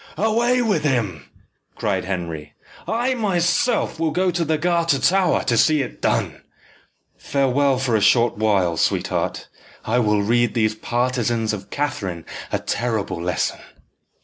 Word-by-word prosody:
"Away 235 Hz, +4 st, +2 dB
with 215 Hz, -8 st, 0 dB
him!" 110 Hz, -, -1 dB, 0.5 s
cried 95 Hz, -4 st, -1 dB
Henry. 85 Hz, -5 st, -5 dB, 0.3 s
"I 240 Hz, +6 st, 0 dB
myself 205 Hz, -1 st, 0 dB
will 165 Hz, -1 st, +1 dB
go 180 Hz, +3 st, +1 dB
to 175 Hz, 0 st, -1 dB
the 160 Hz, -1 st, 0 dB
Garter 170 Hz, -2 st, +1 dB
Tower 185 Hz, +4 st, +2 dB
to 120 Hz, -, +1 dB
see 150 Hz, +4 st, +3 dB
it 125 Hz, -, -9 dB
done. -, -, -1 dB, 0.8 s
Farewell 140 Hz, 0 st, +1 dB
for 125 Hz, -3 st, 0 dB
a 110 Hz, -, +2 dB
short 115 Hz, +3 st, +4 dB
while, 100 Hz, -6 st, +1 dB
sweetheart. -, -, -1 dB, 0.4 s
I 120 Hz, +3 st, +1 dB
will 105 Hz, -3 st, +2 dB
read 120 Hz, +3 st, +1 dB
these 110 Hz, -2 st, +2 dB
partisans 120 Hz, -1 st, -1 dB
of 100 Hz, -2 st, -7 dB
Catherine 105 Hz, -, -3 dB, 0.3 s
a -, -, +1 dB
terrible 110 Hz, -7 st, -2 dB
lesson." 85 Hz, -1 st, -1 dB
125 Hz, 140 wpm, -21 LUFS, 105-170 Hz, 0.8 s, short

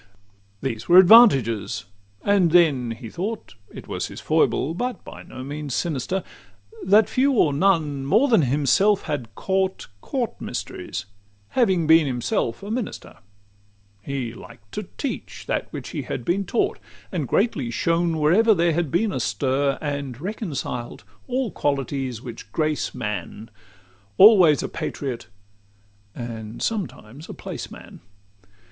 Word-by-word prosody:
XXI 100 Hz, 0 st, -34 dB
These 120 Hz, -1 st, -4 dB
were 175 Hz, -, +8 dB
advantages: 155 Hz, -, +6 dB, 0.4 s
and 200 Hz, -4 st, +3 dB
then 155 Hz, -8 st, +4 dB
he 115 Hz, +1 st, -7 dB
thought 205 Hz, -, -5 dB, 0.2 s
It -, -, -10 dB
was -, -, -3 dB
his -, -, -9 dB
foible, 155 Hz, -, +1 dB
but 245 Hz, +7 st, -4 dB
by -, -, -10 dB
no 130 Hz, -, -9 dB
means 145 Hz, 0 st, -5 dB
sinister 170 Hz, +3 st, -2 dB, 0.6 s
That 205 Hz, +3 st, +5 dB
few 270 Hz, +2 st, +2 dB
or 155 Hz, -, +3 dB
none 150 Hz, -5 st, +1 dB
more 220 Hz, -, +4 dB
than 225 Hz, -9 st, +4 dB
himself 150 Hz, +10 st, +2 dB
had 125 Hz, -9 st, -5 dB
caught 190 Hz, 0 st, -1 dB, 0.2 s
Court 250 Hz, -5 st, -3 dB
mysteries, -, -, -5 dB, 0.4 s
having 190 Hz, -10 st, +2 dB
been 160 Hz, -1 st, +5 dB
himself 120 Hz, +1 st, -2 dB
a 205 Hz, -, -5 dB
minister: 235 Hz, -2 st, -5 dB, 0.8 s
He 130 Hz, -2 st, -4 dB
liked -, -, -14 dB
to -, -, -5 dB
teach -, -, -5 dB
that -, -, -2 dB
which -, -, -7 dB
he -, -, -4 dB
had 120 Hz, -, -5 dB
been 195 Hz, +3 st, 0 dB
taught, 230 Hz, -, 0 dB, 0.3 s
And 160 Hz, -8 st, -2 dB
greatly 160 Hz, -, 0 dB
shone 165 Hz, +6 st, 0 dB
whenever 200 Hz, +9 st, +4 dB
there 170 Hz, -1 st, +2 dB
had 165 Hz, -1 st, -1 dB
been 205 Hz, +8 st, +1 dB
a 130 Hz, -, -2 dB
stir; 135 Hz, +5 st, 0 dB
And 140 Hz, -4 st, -4 dB
reconciled 155 Hz, -, -5 dB, 0.2 s
all 255 Hz, -3 st, -1 dB
qualities 135 Hz, -4 st, -2 dB
which 115 Hz, -4 st, -9 dB
grace 155 Hz, +1 st, -1 dB
man, 105 Hz, +1 st, -5 dB, 0.7 s
Always 185 Hz, -8 st, +7 dB
a -, -, -2 dB
patriot, 125 Hz, -6 st, -5 dB, 0.9 s
and 115 Hz, -2 st, -7 dB
sometimes 155 Hz, -, -4 dB
a -, -, -6 dB
placeman. -, -, -9 dB
150 Hz, 140 wpm, -23 LUFS, 125-190 Hz, 0.9 s, were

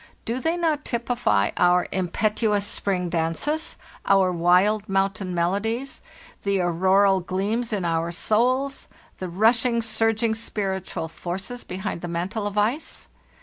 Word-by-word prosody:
Do 235 Hz, +3 st, -2 dB
they 325 Hz, +5 st, 0 dB
not 315 Hz, -4 st, 0 dB
typify 235 Hz, -, 0 dB
our 180 Hz, 0 st, +4 dB
impetuous 205 Hz, +3 st, 0 dB
'spring 190 Hz, -4 st, 0 dB
dances, 170 Hz, -, -1 dB, 0.3 s
our 195 Hz, -2 st, +4 dB
wild 180 Hz, +5 st, +3 dB
mountain 195 Hz, -1 st, 0 dB
melodies, 220 Hz, +10 st, -1 dB, 0.4 s
the 200 Hz, -1 st, 0 dB
auroral 190 Hz, +3 st, +3 dB
gleams 200 Hz, +6 st, -2 dB
in 200 Hz, -4 st, -1 dB
our 165 Hz, 0 st, 0 dB
souls, 250 Hz, +9 st, 0 dB, 0.3 s
the 185 Hz, -, -4 dB
rushing, 230 Hz, +6 st, +3 dB
surging, 225 Hz, 0 st, +1 dB
spiritual 195 Hz, -6 st, -3 dB
forces 190 Hz, +9 st, -5 dB
behind 180 Hz, -2 st, -5 dB
the 175 Hz, -, -4 dB
mantle 185 Hz, +5 st, -2 dB
of 205 Hz, 0 st, -5 dB
ice? 230 Hz, +9 st, -1 dB
200 Hz, 125 wpm, -24 LUFS, 180-225 Hz, 0.4 s, our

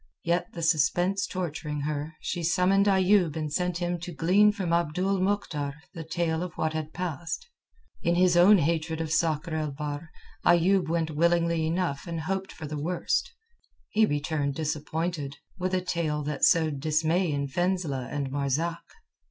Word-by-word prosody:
Yet, 170 Hz, +1 st, 0 dB
the 170 Hz, -, -5 dB
suspense 175 Hz, +5 st, +2 dB
torturing 155 Hz, -5 st, -4 dB
her, 150 Hz, +2 st, -3 dB
she 175 Hz, -, -3 dB
summoned 180 Hz, +4 st, +3 dB
Ayoub 190 Hz, -4 st, +4 dB
and 155 Hz, -2 st, -3 dB
sent 180 Hz, +1 st, 0 dB
him 175 Hz, 0 st, -2 dB
to 175 Hz, +1 st, -6 dB
glean 185 Hz, +7 st, +4 dB
from 190 Hz, -5 st, -2 dB
Abdul 180 Hz, +4 st, +1 dB
Mohktar 165 Hz, -8 st, -1 dB, 0.2 s
the 165 Hz, -3 st, -6 dB
tale 160 Hz, 0 st, -1 dB
of 180 Hz, -1 st, -4 dB
what 160 Hz, -2 st, -1 dB
had 155 Hz, -1 st, -4 dB
passed. 165 Hz, -2 st, -4 dB, 0.5 s
In 170 Hz, +1 st, +1 dB
his 180 Hz, 0 st, +4 dB
own 185 Hz, +4 st, +7 dB
hatred 160 Hz, 0 st, 0 dB
of 160 Hz, -1 st, -2 dB
Sakr 165 Hz, 0 st, 0 dB
el 155 Hz, -1 st, -1 dB
Bahr, 145 Hz, +2 st, -5 dB, 0.3 s
Ayoub 175 Hz, +1 st, +4 dB
went 165 Hz, -1 st, 0 dB
willingly 170 Hz, 0 st, +2 dB
enough 170 Hz, -3 st, -1 dB
and 165 Hz, -1 st, -3 dB
hoping 190 Hz, +3 st, -3 dB
for 160 Hz, -, -7 dB
the 150 Hz, 0 st, -4 dB
worst. 175 Hz, +4 st, -1 dB, 0.6 s
He 220 Hz, 0 st, +3 dB
returned 145 Hz, -1 st, -1 dB
disappointed, 155 Hz, -1 st, -3 dB, 0.2 s
with 185 Hz, +1 st, 0 dB
a 185 Hz, -, +1 dB
tale 165 Hz, -4 st, -1 dB
that 150 Hz, 0 st, -4 dB
sowed 160 Hz, -5 st, +4 dB
dismay 160 Hz, +4 st, +1 dB
in 140 Hz, -1 st, -1 dB
Fenzileh 160 Hz, -5 st, -1 dB
and 140 Hz, -2 st, -3 dB
Marzak. 145 Hz, +5 st, -1 dB
165 Hz, 160 wpm, -27 LUFS, 150-180 Hz, 0.6 s, own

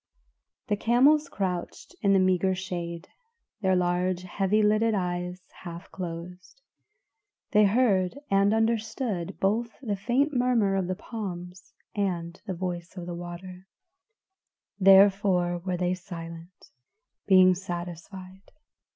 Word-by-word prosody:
The 210 Hz, -, 0 dB
camels 275 Hz, +8 st, +3 dB
crouched 180 Hz, -6 st, -4 dB
in 200 Hz, -3 st, +3 dB
the -, -, +5 dB
meagre 185 Hz, 0 st, +2 dB
shade, 175 Hz, -2 st, -5 dB, 0.5 s
their 190 Hz, -2 st, +2 dB
large, 180 Hz, 0 st, 0 dB
heavy 195 Hz, +3 st, +1 dB
lidded 215 Hz, +1 st, +3 dB
eyes 180 Hz, -1 st, -3 dB, 0.2 s
half 170 Hz, 0 st, -9 dB
closed; 180 Hz, +4 st, -8 dB, 0.9 s
they 210 Hz, -1 st, +5 dB
heard 200 Hz, -2 st, +2 dB
and 195 Hz, +1 st, +4 dB
understood 220 Hz, -3 st, -1 dB
both 225 Hz, +4 st, -1 dB
the 225 Hz, -6 st, -2 dB
faint 250 Hz, +9 st, 0 dB
murmur 245 Hz, -6 st, +2 dB
of 190 Hz, -2 st, 0 dB
the 185 Hz, -, -2 dB
palms 180 Hz, -4 st, -7 dB, 0.2 s
and 175 Hz, -4 st, -3 dB
the 190 Hz, -, -3 dB
voice 175 Hz, 0 st, -5 dB
of 175 Hz, -, -6 dB
the 175 Hz, -, -5 dB
water; 180 Hz, +2 st, -8 dB, 1.1 s
therefore 190 Hz, -2 st, +5 dB
were 180 Hz, 0 st, -3 dB
they 180 Hz, 0 st, 0 dB
silent, 170 Hz, 0 st, -10 dB, 0.6 s
being 185 Hz, -2 st, +7 dB
satisfied. 185 Hz, +1 st, -8 dB
185 Hz, 115 wpm, -27 LUFS, 175-205 Hz, 1.1 s, being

